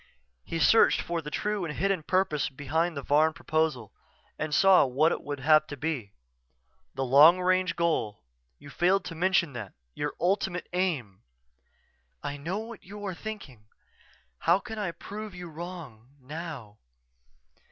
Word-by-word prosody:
_" - - -27 0.4
He 165 - -4
searched 225 +8 +5
for 170 -1 -3
the 150 - -7
true, 210 +5 -2
and 155 -3 -4
hidden, 195 0 +1
purpose 170 -3 0
behind 155 +4 -1
the 140 - -4
Varn 155 +3 +3
proposal 155 -9 -1 0.5
and 155 0 -2
saw 190 +4 +6
what 140 +5 +2
it - - -2
would 145 -2 -6
have 155 +1 +5
to 145 - -7
be. 135 -8 -3 0.8
"The 135 0 -1
long 150 +8 +7
range 185 0 +1
goal 155 - -1 0.3
you 145 - -13
failed 185 +5 +2
to 165 - -6
mention 175 -2 +1
that... 110 -6 -7 0.2
your 145 - -3
ultimate 185 -1 0
aim." 150 - -2 1.0
"_I 145 0 -4
know 170 +7 -3
what 225 0 -8
you 205 +2 -9
are 190 - -3
thinking. 165 - -9 0.7
How 170 +3 +4
can 220 +1 -7
I 200 -4 -1
prove 205 +3 -8
you 180 -1 -8
wrong 160 -9 -9
now? 135 -6 -8
160 Hz, 155 wpm, -28 LUFS, 145-185 Hz, 1.0 s, long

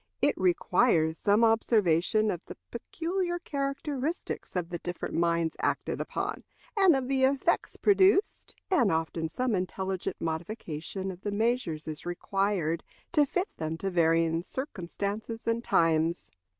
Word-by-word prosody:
It 290 - +3
requires 180 -2 +2
some 205 +3 +3
observation 215 -2 +3
of 175 - -4
the - - -9
peculiar 350 - -2
characteristics 280 - -3
of 175 -2 -1
the 175 -1 -4
different 175 +1 -5
minds 170 -1 +1
acted - - -1
upon, - - -3 0.3
and 385 -6 +6
of 265 -2 -1
the 265 0 +1
effects 275 +5 +2
produced, 395 +1 +3 0.2
and 245 - +4
often 160 0 -1
some 250 +7 -1
intelligent 190 0 -2
modification 170 +2 -4
of 180 0 -11
the 205 - -3
measures 210 -8 0
is 155 -1 -6
required, 175 -2 -1 0.3
to 295 -4 +4
fit 360 +7 -2
them 160 0 -3
to 195 +3 -3
varying 165 -1 +3
circumstances 210 - -5
and 230 +1 0
times. 165 -1 +2
200 Hz, 135 wpm, -29 LUFS, 170-260 Hz, 0.3 s, and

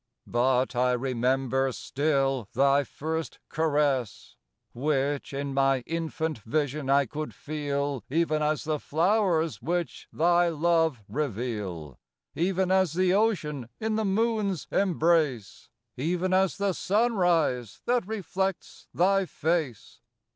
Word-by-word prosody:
But 125 +1 +1
I 125 +1 +2
remember 130 +1 0
still 135 -4 -1
Thy 140 +2 +3
first 160 +4 -4
caress, 145 -7 0 0.4
Which, 140 +2 -1
in 140 0 -3
my 135 -1 +2
infant 160 -1 -3
vision 145 +4 -2
I 140 0 +4
could 150 +5 -6
feel 145 -3 -3
Even 155 +1 +1
as 150 0 0
the 155 -1 -1
flowers, 165 - +1
which 170 +6 -3
Thy 175 +1 +3
love 165 -6 +1
reveal, 105 - -4 0.3
Even 185 +2 0
as 190 -4 +3
the 185 +1 +2
ocean 155 - 0
in 220 0 -1
the 220 - 0
Moon's 210 -3 0
embrace, 160 - +1 0.3
Even 180 +7 -1
as 190 0 +2
the 200 -1 0
sunrise 175 - +1
that 245 -5 +1
reflects 195 -3 -3
Thy 195 +1 +3
face. 150 -11 -2
155 Hz, 115 wpm, -27 LUFS, 135-180 Hz, 0.4 s, I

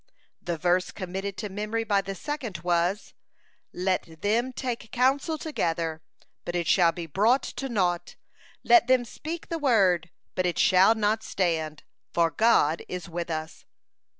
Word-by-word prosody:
The 170 -1 -3
verse 180 +3 +1
committed 190 +2 -5
to 210 - -4
memory 210 +3 -2
by 205 -3 +2
the 195 0 -6
second 245 - -5
was: 175 +3 0 0.6
"Let 180 -3 -2
them 235 +5 +1
take 245 -4 -5
counsel 270 +6 +1
together, 165 - -2 0.4
but 175 - -4
it 175 -1 0
shall 170 0 +4
be 170 0 -6
brought 215 - +2
to 270 - -5
naught; 180 -6 -1 0.5
let 355 -8 +6
them 255 -1 +3
speak 320 +8 -7
the 330 - -2
word, 190 - +3 0.2
but 185 -1 0
it 175 - -2
shall 190 +4 +5
not 215 0 +1
stand; 160 -7 -2 0.3
for 170 -1 +2
God 195 -9 +3
is 180 -1 -6
with 170 0 -4
us." 160 -1 -5
190 Hz, 150 wpm, -26 LUFS, 175-235 Hz, 0.6 s, let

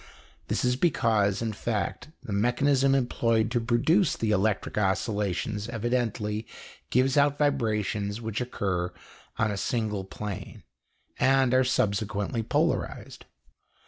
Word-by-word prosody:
This - - 0
is 125 0 +2
because, 115 - +2
in 110 -1 -2
fact, 105 0 -3 0.2
the 105 - -5
mechanism 135 +5 +3
employed 115 -3 +1
to 120 - +1
produce 130 - +2
the 110 -1 0
electric 105 0 0
oscillations 105 +1 -1
evidently 115 -2 -2 0.4
gives 130 +3 +2
out 145 0 +4
vibrations 105 -7 0
which 110 0 -3
occur 95 -7 -2 0.5
on 110 -1 +1
a 100 - -3
single 105 -2 -1
plane 100 +1 -7 0.6
and 135 -1 +3
are 130 0 +5
subsequently 105 -2 0
polarized. 110 - -1
115 Hz, 115 wpm, -27 LUFS, 105-125 Hz, 0.6 s, are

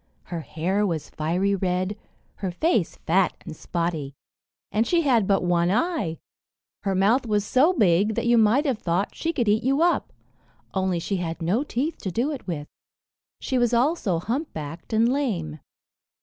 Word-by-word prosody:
Her 170 -1 -5
hair 165 +7 -1
was 165 -7 -2
fiery 180 +6 0
red, 185 +1 -1 0.4
her 195 - -3
face 190 - 0
fat 180 +3 +2
and 160 - -7
spotty, 160 -5 -3 0.6
and 220 +2 +1
she 345 -1 +3
had 240 - +3
but 195 -2 +2
one 175 -1 +2
eye. 225 - 0 0.6
Her 195 -2 -1
mouth 225 +7 +3
was 210 -1 +1
so 270 - +4
big 205 - +3
that - - -1
you 240 0 +4
might 230 +6 +4
have 260 -7 0
thought 180 0 -1
she 330 - -2
could 240 -8 -1
eat 210 +2 +3
you 270 +6 +2
up, 350 - +1 0.6
only 190 -2 0
she 190 +4 -2
had 165 -2 -4
no 185 - +1
teeth 295 +3 -2
to 190 - -4
do 245 - 0
it 280 -8 -7
with; 150 -4 -4 0.7
she 260 - -1
was 240 0 +2
also 240 - +1
humpbacked 165 - -5
and 225 +1 +3
lame. 200 - -1
200 Hz, 170 wpm, -25 LUFS, 170-245 Hz, 0.7 s, so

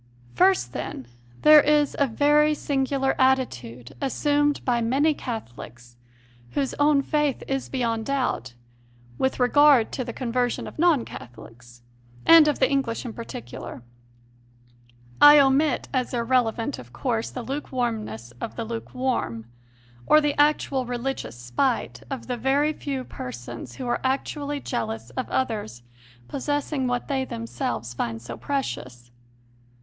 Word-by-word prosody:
First, 125 -4 +3
then, 130 - -5 0.4
there 305 0 +9
is 295 0 +2
a 280 - +4
very 295 +5 +3
singular 270 -1 0
attitude 125 - 0
assumed 290 +1 +1
by 240 -2 +1
many 275 +7 +2
Catholics, 120 - -8 0.6
whose 275 -2 -1
own 290 -1 +4
faith 295 -2 0
is 270 -1 -2
beyond 230 -4 -1
doubt, 255 - -1 0.6
with 265 - 0
regard 270 -1 +5
to 255 - -3
the 235 - -5
conversion 245 0 -1
of - - -10
non 325 -8 +3
Catholics, 120 0 -12 0.4
and 330 -2 +8
of 295 - +1
the 260 - +3
English 270 -3 -1
in 235 - -5
particular. 120 - -8 1.4
I 295 0 +10
omit 275 0 +3
as 255 -1 -1
irrelevant, 235 +1 0
of 120 -1 -12
course, 225 - -2
the 250 - -6
lukewarmness 230 - -4
of - - -5
the 230 - -4
lukewarm, 230 - -3 0.6
or 305 - +7
the 295 -1 +1
actual 290 -3 +2
religious 245 - -4
spite 120 - -1
of 270 -3 -5
the 250 -1 -3
very 280 +5 +2
few 275 -3 -4
persons 120 - -8
who 255 - -6
are 240 - -1
actually 285 +2 -2
jealous 115 +1 -4
of 255 - -4
others 210 - -2 0.4
possessing 290 -1 -2
what 245 -1 -2
they 270 -2 0
themselves 230 - -4
find 115 -1 -3
so 120 - -8
precious. 125 - -4
255 Hz, 135 wpm, -25 LUFS, 190-280 Hz, 1.4 s, I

